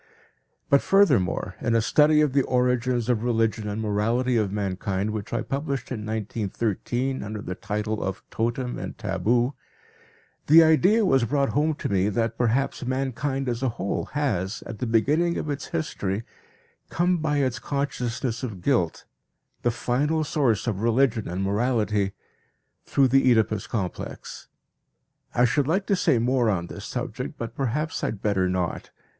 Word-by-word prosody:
But 140 - +4
furthermore, 150 - +3
in 115 - +1
a - - +5
study 150 +5 +4
of 150 -4 +1
the 140 - +4
origins 125 -2 +1
of 120 -3 +1
religion 115 -2 0
and 105 +1 -3
morality 115 +4 0
of 105 -4 +1
mankind 100 0 -2
which 105 -2 -5
I - - -1
published 140 -2 -3
in 120 - -3
1913, 110 +4 -2
under 105 +1 -5
the 90 - -5
title 105 +3 -3
of 95 -1 -4
Totem 120 +2 -2
and - - -6
Taboo, 115 +5 +1 0.9
the 165 +3 +8
idea 185 +8 +4
was 135 -8 +3
brought 140 +2 +1
home 150 +1 +1
to - - -4
me 100 0 +1
that 115 +2 -1
perhaps 125 +4 0
mankind 135 +1 -2
as 120 0 -2
a 130 - +1
whole 95 +2 -2
has, 110 -9 -1
at 115 - -7
the 125 - -2
beginning 150 +10 +2
of 150 - -2
its 145 - -4
history, 110 - -3 0.7
come 180 +1 +1
by 155 -2 0
its 130 -5 0
consciousness 125 -4 -2
of 105 -9 -6
guilt, 105 - +1 0.6
the 120 - +2
final 140 +7 0
source 135 -8 +1
of 105 -5 -2
religion 115 -1 +2
and 90 +2 -3
morality, 105 -1 0 0.7
through 135 -1 +3
the 135 0 +4
Oedipus 110 -3 +1
complex. 95 -6 -5 0.9
I 125 - +5
should 130 +3 +1
like 190 +5 +1
to 200 - +2
say 180 -8 +2
more 120 0 +2
on 90 -5 0
this - - -8
subject, - - -5
but 115 - -5
perhaps 140 +4 -2
I - - +2
had 105 - -5
better 95 -3 +1
not. 90 -2 -2
120 Hz, 160 wpm, -25 LUFS, 105-135 Hz, 0.9 s, the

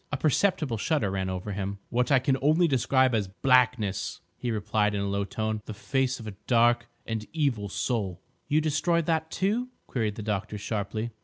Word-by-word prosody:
A 145 - 0
perceptible 155 - +1
shudder 110 -4 0
ran 95 -1 -1
over 95 +2 -4
him. 100 0 -3
"What 125 +3 +1
I 135 - +7
can 130 +1 +2
only 155 +5 +4
describe 130 -2 +3
as—blackness," 110 0 +1
he 125 - -4
replied 105 -1 +1
in 100 - -1
a 100 - -1
low 100 0 0
tone; 110 +1 -2
"the 110 - -6
face 130 +3 0
of 115 - -9
a 105 - -5
dark 120 -1 +4 0.2
and 110 -2 -3
evil 130 -10 0
soul." 100 -5 -2 0.3
"You 155 +2 +3
destroyed 165 +2 +1
that, 160 -1 0
too?" 215 +9 0 0.2
queried 110 -5 -1
the 110 - -6
doctor 105 0 -2
sharply. 110 +2 -3
115 Hz, 180 wpm, -27 LUFS, 105-140 Hz, 0.3 s, I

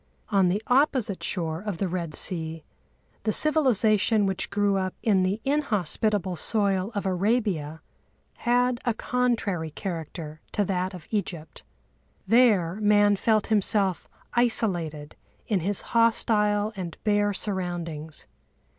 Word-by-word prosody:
On 195 -3 +3
the 200 +5 0
opposite 255 -6 +2
shore 165 -3 -2
of 205 -4 -4
the 195 - -1
Red 170 -3 -4
Sea 160 -3 +1 0.6
the 215 - 0
civilisation 225 -8 +3
which 190 -1 -2
grew 200 0 +1
up 185 -1 -2
in 200 -4 +3
the 190 +3 0
inhospitable 210 - 0
soil 200 -1 0
of 205 - -2
Arabia 185 -5 -1 0.5
had 245 0 +1
a 240 -3 0
contrary 230 -10 -1
character 160 -2 -6
to 205 - +1
that 185 0 -2
of 170 -4 -11
Egypt. 175 -7 -4 0.6
There 200 -5 +3
man 205 -1 +4
felt 215 +1 +1
himself 195 -3 0 0.2
isolated 175 -11 -1 0.3
in 205 -4 0
his 195 +4 -1
hostile 215 -2 +2
and 180 -4 -6
bare 205 -1 +2
surroundings. 175 -6 -5
200 Hz, 120 wpm, -26 LUFS, 175-220 Hz, 0.6 s, man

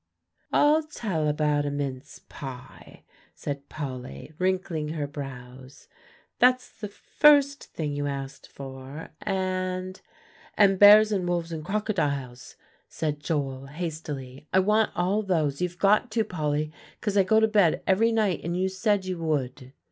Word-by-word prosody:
"I'll 300 +2 +4
tell 205 - -3
about 150 -1 +1
a 145 - -1
mince 140 -2 -5
pie," 130 -3 -10 0.3
said 140 0 -6
Polly, 130 - -7
wrinkling 185 -4 -1
her 150 -3 -2
brows; 130 -2 -9 0.5
"that's 250 +1 +3
the 215 - -7
first 285 +6 +3
thing 150 -3 -4
you 145 0 -2
asked 135 -1 -6
for; 135 +2 -9
and" 185 -1 -2 0.6
"And 195 -2 +4
bears 210 +1 +8
and 185 -4 -1
wolves 170 -1 -1
and 160 -2 -5
crocodiles," 145 - -2 0.3
said 150 -2 -3
Joel 135 -3 -3
hastily; 150 -3 -6
"I - - +3
want 210 +3 +3
all 190 +4 +1
those; 160 -8 0
you've 180 -1 -2
got 210 +6 +3
to, 225 -1 +2
Polly, 155 -5 -2 0.3
'cause 205 -2 -2
I 200 - +6
go 220 +4 +4
to 220 - +4
bed 205 -7 +3
every 220 +5 +3
night, 215 -6 +1
and 170 +1 -2
you 190 +1 +1
said 200 0 0
you 185 -2 -4
would." 135 -5 -2
165 Hz, 145 wpm, -26 LUFS, 145-200 Hz, 0.6 s, bears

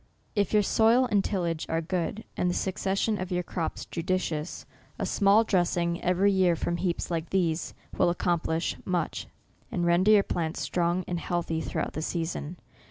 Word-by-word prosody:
If 205 -3 +1
your 210 -1 +4
soil 230 +5 +4
and 200 -2 +3
tillage 170 -5 -2
are 165 - +1
good, 180 +5 -2
and 180 - +1
the 175 - -1
succession 195 +2 0
of 185 0 -5
your 180 0 0
crops 170 -1 -4
judicious, 170 -2 -2 0.3
a - - -2
small 205 +2 +4
dressing 175 -4 +1
every 185 +3 +3
year 185 -3 +3
from 170 +1 -2
heaps 175 -1 -2
like 165 -1 -2
these, 170 -4 0 0.2
will - - +3
accomplish 170 -1 0
much, 175 -4 -2 0.4
and 175 - 0
render 175 +4 +4
your 210 -2 +7
plants 165 -4 -2
strong 175 +1 0
and 175 -1 -2
healthy 170 -2 -2
throughout - - -3
the 155 - -3
season. 165 0 -3
175 Hz, 165 wpm, -28 LUFS, 170-195 Hz, 0.4 s, your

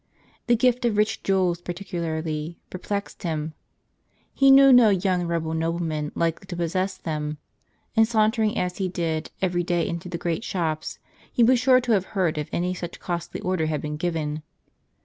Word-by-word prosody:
The 240 - +5
gift 250 +1 +2
of 220 -3 +1
rich 210 +1 +1
jewels 185 -3 +1
particularly 165 -3 -4
_ - - -44
perplexed 200 +2 -4
him. 160 -4 -3 0.8
He 275 0 +4
knew 270 0 +8
no 245 -3 +7
young 185 -2 +1
Roman 160 -1 -1
nobleman 165 -2 -2
likely 170 +3 -1
to 185 - -5
possess 185 +3 -1
them; 150 -3 -4 0.6
and 225 -1 +5
sauntering, 220 -1 +2
as 180 0 -1
he 190 -2 -1
did, 165 -3 -2
every 180 -1 +1
day 175 -1 0
into 170 +2 -5
the 170 - -3
great 170 +3 -2
shops, 160 -7 -2 0.3
he 240 - +3
was 250 +2 +5
sure 255 +1 +5
to 245 -1 -1
have 195 -4 +3
heard 170 -5 +1
if 150 - -4
any 180 +1 -1
such 175 -1 -7
costly 175 -1 -4
order 180 -4 0
had 155 -1 -1
been 150 0 -3
given. 155 -2 -2
175 Hz, 175 wpm, -24 LUFS, 160-200 Hz, 0.8 s, knew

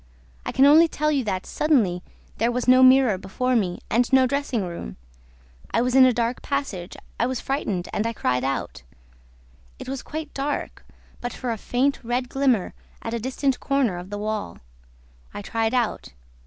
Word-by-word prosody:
I - - -1
can 270 - +4
only 315 +4 +7
tell 305 -1 -1
you 280 -3 +1
that, 185 -3 -2
suddenly, 225 - +1 0.4
there 230 +2 +2
was 250 +1 -2
no 255 +1 +7
mirror 255 -6 +6
before 250 +7 -1
me 185 -6 0
and 240 +3 +1
no 265 -1 +6
dressing 270 -4 -1
room. 170 - -7 0.7
I 230 - +1
was 250 0 0
in 265 0 +8
a - - +4
dark 235 +1 -1
passage, 230 -10 -4 0.2
I 235 - +2
was 255 -2 -2
frightened 205 -10 -2
and 215 - 0
I - - -1
cried 125 - -1
out. 135 - -3 1.0
It - - -9
was 265 0 -4
quite 310 -1 -7
dark, 280 +2 -3 0.4
but 245 - -5
for 250 -2 -4
a - - -1
faint 265 +6 0
red 245 +2 -2
glimmer 260 -8 +1 0.3
at 225 - -4
a 235 - -1
distant 260 +2 -1
corner 265 -10 0
of 180 +2 -10
the 205 - -5
wall. 210 - -4 0.8
I 205 - -6
tried 225 +3 -1
out. 235 - -1
245 Hz, 180 wpm, -24 LUFS, 210-270 Hz, 1.0 s, in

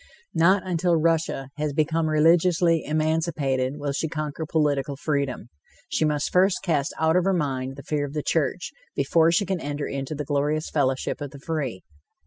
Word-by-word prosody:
Not 185 +4 +3
until 175 -1 +1
Russia 160 -4 0
has 150 -1 -1
become 160 +2 +1
religiously 165 +1 +3
emancipated, 150 -4 0
will 145 -1 -2
she 145 +3 -1
conquer 155 0 -4
political 145 -3 0
freedom. 140 -5 -2 0.4
She 155 - +1
must 150 -1 -1
first 185 +1 +3
cast 155 -4 0
out 160 +1 +3
of 180 - +4
her 195 0 +2
mind 135 -4 -2
the 140 - -10
fear 145 -2 -1
of 140 - -10
the 150 -1 -2
church, 165 +3 -1 0.2
before 165 0 +3
she 200 +4 +2
can 190 -2 -2
enter 145 0 -3
into 135 +2 -4
the 145 0 -4
glorious 145 +2 -1
fellowship 135 -1 0
of 145 - -4
the 140 - -12
free. 140 - -3
155 Hz, 175 wpm, -25 LUFS, 140-165 Hz, 0.4 s, of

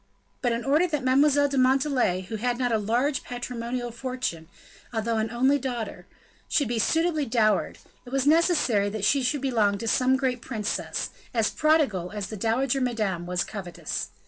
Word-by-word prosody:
But, 245 - +1
in 230 0 -2
order 300 +6 +3
that 300 -5 -2
Mademoiselle 285 +2 +4
de 275 -1 0
Montalais, 255 -7 +2
who 220 +4 -6
had 245 +2 -1
not 245 -1 0
a 220 - +2
large 245 +7 0
patrimonial 245 0 -4
fortune, 245 -9 -4 0.4
although 225 0 -1
an 220 0 0
only 260 +5 +2
daughter, 245 -4 -5 0.4
should 285 - +2
be 235 0 -1
suitably 320 +5 +1
dowered, 220 -2 +1 0.3
it 245 - -12
was 270 0 0
necessary 295 - +3
that 210 -1 -3
she 275 +5 +3
should 260 +2 0
belong 220 -7 +1
to 230 - -5
some 255 +3 +3
great 260 -2 -1
princess, 215 -4 -3 0.2
as 225 -2 +2
prodigal 290 - +2
as 205 -3 -4
the 215 - -5
dowager 245 +6 0
Madame 210 -8 -1
was 180 0 0
covetous. 185 -5 -5
245 Hz, 170 wpm, -26 LUFS, 220-270 Hz, 0.4 s, Mademoiselle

